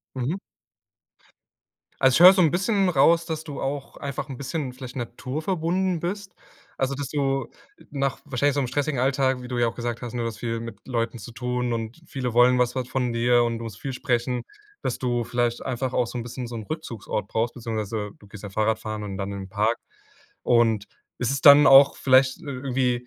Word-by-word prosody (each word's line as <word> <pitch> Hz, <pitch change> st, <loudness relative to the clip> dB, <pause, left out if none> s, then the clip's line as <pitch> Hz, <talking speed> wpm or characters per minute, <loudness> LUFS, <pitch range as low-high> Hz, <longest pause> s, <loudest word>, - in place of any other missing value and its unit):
Mhm. 130 Hz, +8 st, -1 dB, 1.7 s
Also, 130 Hz, -1 st, +5 dB
ich -, -, +2 dB
höre 180 Hz, +2 st, +11 dB
so 190 Hz, -2 st, +3 dB
'n 160 Hz, -, +4 dB
bisschen 195 Hz, +3 st, +1 dB
raus, 165 Hz, +1 st, +4 dB
dass 160 Hz, -1 st, -4 dB
du 145 Hz, -3 st, -6 dB
auch 140 Hz, 0 st, -4 dB
einfach 140 Hz, 0 st, -5 dB
'n 135 Hz, -, -6 dB
bisschen 140 Hz, 0 st, -4 dB
vielleicht 125 Hz, 0 st, -9 dB
naturverbunden 160 Hz, -, -2 dB
bist. 190 Hz, +2 st, -4 dB, 0.4 s
Also, 135 Hz, +1 st, -1 dB
dass 140 Hz, -1 st, -4 dB
du 135 Hz, -1 st, -1 dB, 0.4 s
nach 140 Hz, -2 st, -1 dB
wahrscheinlich 140 Hz, 0 st, 0 dB
so 140 Hz, -, +1 dB
'm 130 Hz, -, 0 dB
stressigen 140 Hz, +2 st, -1 dB
Alltag, 130 Hz, -1 st, +1 dB
wie 125 Hz, -, -8 dB
du 125 Hz, -, -3 dB
ja 120 Hz, -1 st, +3 dB
auch -, -, -7 dB
gesagt 120 Hz, -1 st, -4 dB
hast, 120 Hz, -2 st, -5 dB
ne 120 Hz, -, -2 dB
du 115 Hz, -, -1 dB
hast 110 Hz, -, -8 dB
viel 115 Hz, -1 st, -3 dB
mit 115 Hz, 0 st, -8 dB
Leuten 120 Hz, -1 st, -2 dB
zu 105 Hz, +4 st, -9 dB
tun, 125 Hz, 0 st, -2 dB
und 115 Hz, +5 st, -4 dB
viele 125 Hz, -3 st, -4 dB
wollen 125 Hz, +1 st, +5 dB
was 125 Hz, 0 st, +1 dB
was 130 Hz, -1 st, -3 dB
von 125 Hz, -3 st, -1 dB
dir, 120 Hz, +1 st, +3 dB
und 115 Hz, -1 st, -1 dB
du 115 Hz, -, -7 dB
musst 110 Hz, -3 st, -8 dB
viel 135 Hz, -2 st, -4 dB
sprechen, 125 Hz, -1 st, -1 dB, 0.4 s
dass -, -, -2 dB
du 120 Hz, -2 st, 0 dB
vielleicht 120 Hz, 0 st, -1 dB
einfach 130 Hz, 0 st, -2 dB
auch 125 Hz, -, +1 dB
so 120 Hz, -, -5 dB
'n -, -, -3 dB
bisschen 120 Hz, 0 st, -6 dB
so 120 Hz, -, -6 dB
'n 110 Hz, -, -6 dB
Rückzugsort 115 Hz, -8 st, -5 dB
brauchst 115 Hz, +2 st, -1 dB
beziehungsweise 110 Hz, -3 st, -4 dB
du 105 Hz, -, -17 dB
gehst 105 Hz, 0 st, -12 dB
dann 100 Hz, -, -7 dB
Fahrradfahren 110 Hz, 0 st, -1 dB
und 100 Hz, -1 st, -5 dB
dann 100 Hz, 0 st, -4 dB
in 100 Hz, -, -5 dB
den 95 Hz, -, -9 dB
Park. 105 Hz, +4 st, +1 dB, 0.7 s
Und 115 Hz, -3 st, +3 dB, 0.3 s
ist 125 Hz, 0 st, 0 dB
es 140 Hz, -, -1 dB
dann 145 Hz, 0 st, +9 dB
auch 135 Hz, +1 st, +8 dB
vielleicht 130 Hz, 0 st, +3 dB
i -, -, -13 dB
irgendwie, 125 Hz, -2 st, -1 dB
125 Hz, 215 wpm, -25 LUFS, 115-140 Hz, 1.7 s, höre